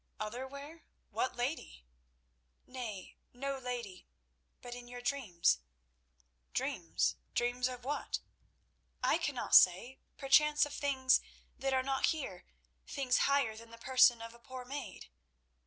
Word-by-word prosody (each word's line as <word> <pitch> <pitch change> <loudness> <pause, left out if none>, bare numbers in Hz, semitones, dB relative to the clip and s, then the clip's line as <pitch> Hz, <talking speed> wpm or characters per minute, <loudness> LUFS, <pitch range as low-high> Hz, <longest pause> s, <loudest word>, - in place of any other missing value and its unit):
"Other 235 +5 -4
where? 285 +4 -10 0.3
What 260 - -1
lady—?" 245 - -4 0.8
"Nay, 230 -7 -7 0.2
no 275 +2 -3
lady; 240 -7 -6 0.5
but 245 - -8
in 245 0 -9
your 245 0 -8
dreams." 195 - +1 1.0
"Dreams? - - 0 0.2
Dreams 245 +1 +1
of 250 -1 -7
what?" 290 +2 -2 0.8
"I - - +3
cannot - - -3
say. 190 +9 +6 0.2
Perchance 300 +2 +5
of 290 - -8
things 265 -3 +3 0.3
that 270 0 -2
are 260 -1 +2
not 270 0 +1
here—things 265 - -3
higher 275 -6 +2
than 230 +1 -12
the 230 - -12
person 255 -1 +5
of 230 0 -8
a 235 - -16
poor 255 +1 -9
maid." 255 - -7
250 Hz, 125 wpm, -34 LUFS, 230-275 Hz, 1.0 s, say